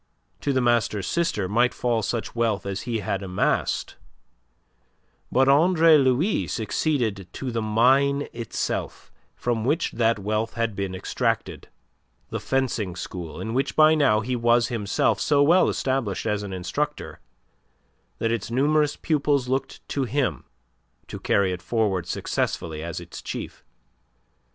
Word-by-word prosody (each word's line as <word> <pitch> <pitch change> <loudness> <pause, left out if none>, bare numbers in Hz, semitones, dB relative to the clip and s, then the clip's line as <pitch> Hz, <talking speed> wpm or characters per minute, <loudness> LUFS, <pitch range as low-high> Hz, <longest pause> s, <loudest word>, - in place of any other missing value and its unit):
To 145 - -1
the 130 -1 +1
master's 120 -5 +1
sister 165 - 0
might 120 +5 +2
fall 120 -2 0
such 110 +2 -3
wealth 115 -4 0
as 100 -1 -3
he 115 -2 -1
had 100 0 -2
amassed, 95 -1 -1 1.3
but 130 +1 +3
Andre 160 +3 +5
Louis 135 - +2
succeeded 110 - -1
to 130 -2 -4
the 115 -1 -1
mine 135 +6 +3
itself 115 -2 -4 0.2
from 120 -2 -1
which 150 +7 0
that 115 -1 +2
wealth 110 +3 -2
had 115 -3 -1
been 95 -1 -3
extracted, 95 - -2 0.6
the - - -3
fencing 120 -9 -1
school 90 -2 -7
in 110 - -4
which 135 +3 -1
by 155 0 +6
now 140 -9 +3
he 125 +3 -2
was 120 0 +3
himself 105 -5 0
so 145 -1 +3
well 175 +5 +5
established 130 -8 -1
as 105 -2 0
an 100 -1 -6
instructor 90 -2 -3 1.0
that 115 - 0
its 115 -3 -2
numerous 145 +4 +2
pupils 145 -4 0
looked 135 +1 -3
to 140 -2 -1
him 125 - -1 0.6
to - - -6
carry 95 -2 +2
it 90 - -6
forward 95 -4 0
successfully 80 -2 -2
as 85 0 -5
its - - -9
chief. - - -7
115 Hz, 140 wpm, -24 LUFS, 105-135 Hz, 1.3 s, by